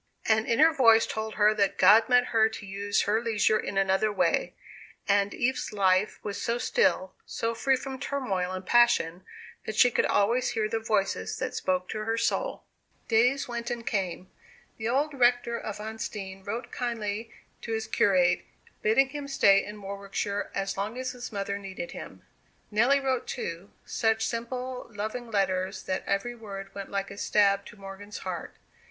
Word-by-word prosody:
An 220 0 +2
inner 305 +8 +5
voice 225 -6 +6
told 220 0 -4
her 210 0 +4
that 200 -3 +1
God 215 +5 +6
meant 250 0 +4
her 220 -1 +5
to 220 -1 -8
use 200 +1 -1
her 215 +2 +1
leisure 215 -2 +2
in 195 - -4
another 195 +2 +2
way; 205 - +1 0.5
and 200 0 +3
Eve's 255 +4 -1
life 195 -1 +2
was 205 -1 -4
so 235 +1 0
still, 245 - +1
so 230 0 -3
free 265 +3 +2
from 265 0 -6
turmoil 230 -10 -2
and 185 0 -5
passion, 190 -7 +3 0.4
that 220 - -3
she 245 - +5
could - - +2
always 235 +5 +2
hear 215 -1 +1
the 225 +1 -1
voices 195 - -1
that - - -3
spoke 185 -1 -1
to 215 0 -4
her 225 +1 0
soul. - - -1 0.5
Days 250 +5 +3
went 240 0 -4
and 240 -1 -4
came. 185 -3 -3 0.5
The 220 +1 -2
old 285 +4 +1
rector 245 -2 +2
of 215 -3 -5
Huntsdean 210 -3 -6
wrote 235 +4 -4
kindly 225 -2 -3 0.3
to 230 - -6
his 220 0 -1
curate, 180 -5 +3 0.4
bidding 265 +5 +3
him 290 0 -6
stay 200 -8 +4
in 210 0 -8
Warwickshire 200 +1 -4
as 195 0 -2
long 210 +5 -3
as 255 0 -3
his 245 -1 -8
mother 200 -1 -3
needed 190 -3 -7
him. - - -9 0.5
Nelly 240 +7 +4
wrote 260 -2 -1
too; 175 -5 -5 0.2
such 225 -1 +1
simple 250 +2 -4
loving 220 +3 -5
letters 190 -2 -1
that 185 - -2
every 200 +5 -1
word 200 -4 -8
went 200 -1 -7
like 195 0 -3
a 200 - -9
stab 200 -1 +2
to 210 - -13
Morgan's 195 +1 -9
heart. - - -5
215 Hz, 170 wpm, -28 LUFS, 195-240 Hz, 0.5 s, voice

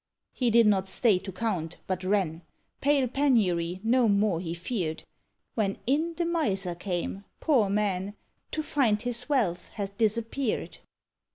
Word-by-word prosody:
He 250 -2 +1
did 230 0 +6
not 195 -2 +3
stay 205 -1 +3
to 190 - -7
count, 185 -5 -3
but 185 -1 -3
ran; 185 -4 0 0.4
Pale 280 -3 +2
Penury 190 -11 +2
no 235 0 +3
more 200 -4 +2
he 170 -1 -4
feared. 175 -3 -3 0.5
When 200 -3 0
in 315 +6 +1
the 345 - -1
miser 200 - 0
came 180 +2 -4 0.2
poor 250 -10 +3
man! 200 -1 -1 0.4
To 310 - -1
find 245 -9 +2
his 245 +2 -3
wealth 205 -12 +1
had 200 -1 -4
disappeared. 230 +3 -1
210 Hz, 145 wpm, -28 LUFS, 185-245 Hz, 0.5 s, did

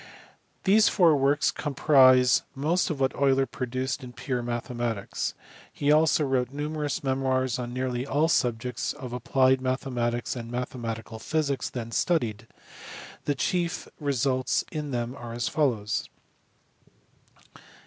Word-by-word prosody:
These 210 +3 +5
four 170 -6 +5
works 140 +2 +2
comprise 130 -4 +4
most 160 +7 +1
of 155 -4 -3
what 135 -1 +1
Euler 135 -1 +3
produced 130 +2 -3
in 125 -1 -9
pure 125 0 -3
mathematics. 120 -3 -3 0.4
He 145 +1 0
also 155 0 +4
wrote 130 -3 0
numerous 150 +1 -3
memoirs 130 -2 0
on 120 -1 -4
nearly 125 0 -2
all 145 +3 +1
the 165 - +3
subjects 125 -3 0
of 130 -5 -8
applied 130 +2 +2
mathematics 125 -2 -1
and 115 -2 -6
mathematical 115 -2 -5
physics 145 0 -1
then 115 -2 -6
studied: 115 -9 0 0.8
the 145 - 0
chief 175 +4 -1
results 135 -3 0
in 150 -2 -4
them 120 -1 -2
are 120 -3 -8
as 120 0 -2
follows. 115 -9 0
130 Hz, 130 wpm, -27 LUFS, 120-145 Hz, 0.8 s, These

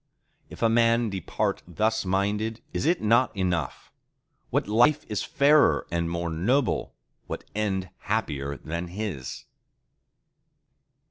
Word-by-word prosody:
—If - - -7
a - - +6
man 115 0 +3
depart 95 -3 -2
thus 110 +4 0
minded, 105 +4 0
is - - -1
it 175 -4 +2
not 115 +1 +3
enough? 90 -3 -2 0.6
What - - 0
life 125 +8 +3
is 105 - -2
fairer 145 +2 +4
and 85 -1 0
more 85 0 -2
noble, 120 - 0 0.3
what - - -5
end 95 -3 -1
happier 75 -10 -2
than 85 +2 -5
his? 90 -8 -5
105 Hz, 120 wpm, -26 LUFS, 85-115 Hz, 0.6 s, a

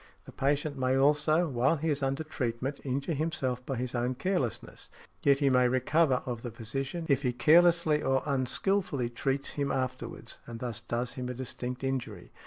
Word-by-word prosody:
The - - -11
patient 140 +1 0
may 130 0 +2
also, 150 +5 +3
while 130 +2 +2
he 160 +2 0
is 145 0 -1
under 135 +3 -1
treatment, 130 -2 -3
injure 140 +4 -2
himself 135 -5 -2
by 135 - -1
his 125 0 -3
own 125 +1 0
carelessness; 140 - -2 0.3
yet 140 0 +3
he 140 -1 +4
may 125 -1 +5
recover 130 +2 +2
of 120 -2 -4
the 120 - -5
physician, 135 +9 -4
if 140 -2 +2
he 125 -4 +1
carelessly 160 +3 +4
or 135 0 +1
unskilfully 140 0 0
treats 135 +3 -1
him 140 -1 -1
afterwards, 130 -1 -4
and 115 -1 -7
thus 120 -3 -3
does 120 +1 -3
him 125 -1 -5
a 125 - -4
distinct 125 0 -5
injury. 125 -8 -3
135 Hz, 180 wpm, -30 LUFS, 125-150 Hz, 0.3 s, may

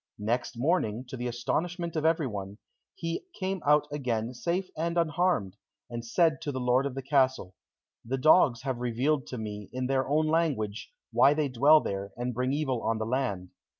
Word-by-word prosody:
Next 115 +3 -2
morning, 125 - 0
to 130 - -6
the 125 0 -3
astonishment 170 +8 -2
of 155 0 -1
everyone, 105 - -1 0.4
he 165 - -4
came 190 -1 -2
out 150 0 +4
again 125 -5 -2
safe 175 +9 -2
and 170 +2 -2
unharmed, 160 - +1 0.3
and 120 0 -4
said 160 +6 +2
to 150 -3 -3
the 130 - -4
lord 125 +2 +2
of 135 - -7
the 135 - -5
castle, 130 -8 +1 0.5
"The 130 +3 -2
dogs 130 -3 +4
have 130 -3 -2
revealed 125 +4 0
to 125 - -6
me, 105 -2 -6
in 130 0 -3
their 130 0 0
own 155 +2 +2
language, 150 -11 0 0.2
why 145 - +5
they 150 -2 0
dwell 145 +5 +6
there, 100 0 -4
and 125 +1 -2
bring 125 +2 -1
evil 135 -5 -1
on 115 0 0
the 110 - -2
land. 110 -7 -2
130 Hz, 185 wpm, -28 LUFS, 120-155 Hz, 0.5 s, dwell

